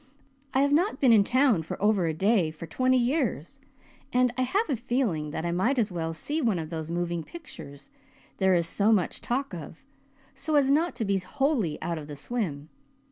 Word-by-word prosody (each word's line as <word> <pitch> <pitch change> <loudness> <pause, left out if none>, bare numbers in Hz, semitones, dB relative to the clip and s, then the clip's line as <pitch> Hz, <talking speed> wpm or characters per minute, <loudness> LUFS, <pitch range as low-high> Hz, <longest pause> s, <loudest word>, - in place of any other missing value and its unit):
I 265 - +4
have 285 0 +2
not 335 -2 +2
been 255 -4 +5
in 210 -2 +6
town 250 -5 +3
for 160 - -6
over 205 -4 +2
a 160 - 0
day 195 -1 +2
for 155 +1 -8
twenty 255 +10 +2
years 250 - -1 0.5
and 250 -1 +2
I 255 - -1
have 390 - +1
a 285 - 0
feeling 230 - -1
that 160 +2 -4
I 170 - 0
might 225 +11 +1
as 215 -5 +1
well 165 -2 -3
see 290 - -3
one 225 -8 +1
of 160 -1 -5
those 160 -1 -4
moving 170 0 -2
pictures 140 - -11 0.5
there 190 -1 +3
is 170 -1 +2
so 205 +5 +2
much 195 -6 +1
talk 260 -2 -2
of, 165 - -9 0.5
so 280 +3 -2
as 275 -2 +4
not 320 +3 +2
to 235 -2 -2
be 195 -1 +1
wholly 230 - -1
out 170 -2 -2
of 150 - -9
the 150 - -7
swim. 155 - -4
210 Hz, 205 wpm, -27 LUFS, 165-265 Hz, 0.5 s, in